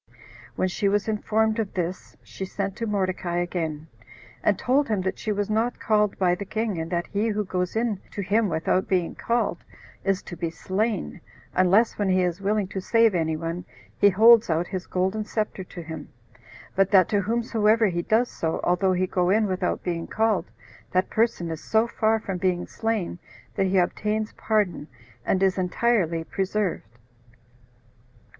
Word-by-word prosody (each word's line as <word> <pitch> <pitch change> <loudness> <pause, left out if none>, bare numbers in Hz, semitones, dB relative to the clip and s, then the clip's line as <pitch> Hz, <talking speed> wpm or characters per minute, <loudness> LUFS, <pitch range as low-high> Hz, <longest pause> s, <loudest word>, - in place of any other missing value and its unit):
When 185 - +1
she 195 +2 0
was 205 +1 0
informed 220 +1 +1
of 210 -3 -3
this, 180 0 -4
she - - -8
sent 195 0 -3
to 230 - -3
Mordecai 185 -4 -1
again, 165 -3 -2 0.6
and - - +2
told 275 +3 +2
him 215 -3 +1
that 190 +1 -3
she 215 - -2
was 205 -1 -1
not 225 +3 0
called 210 -2 +1
by 180 -2 +3
the 180 - -3
king, 215 -2 -2
and 160 - -5
that 175 -1 0
he 205 +3 -1
who 210 -1 -1
goes 180 0 -2
in 225 -3 0
to 200 - -5
him 210 +3 +2
without 170 +3 0
being 180 -3 0
called, 235 +1 -1 0.4
is 195 -1 0
to 175 - -8
be 170 0 -2
slain, 190 +3 -2 0.3
unless 195 +6 +3
when 205 -2 +1
he 185 0 +3
is 180 +1 -2
willing 205 0 0
to 190 - -4
save 230 +2 +4
any 160 -3 0
one, 165 +2 -4 0.3
he 205 - +5
holds 225 +3 +6
out 165 +1 +1
his 185 -2 -4
golden 190 +4 0
scepter 210 -2 -3
to 175 -1 -9
him; 160 -2 -8 0.7
but 195 0 +3
that 190 -3 +6
to 205 -1 +2
whomsoever 225 +1 +2
he 175 -4 0
does 225 +7 +2
so, 160 -1 -2
although 185 +1 +2
he 185 +1 +1
go 180 -1 0
in 215 +3 +3
without 185 -2 -1
being 170 -2 -3
called, 215 -5 0 0.4
that 185 +1 +1
person 220 -7 +1
is 160 -1 -6
so 220 +1 +2
far 225 -1 +1
from 195 -4 -4
being 180 -2 0
slain, 220 -6 -2 0.3
that 195 - +1
he 190 +1 +1
obtains 210 +4 0
pardon, 205 -8 0 0.4
and 190 +7 +1
is 190 0 +2
entirely 180 -3 +1
preserved. 190 - -2
195 Hz, 175 wpm, -25 LUFS, 180-215 Hz, 0.7 s, holds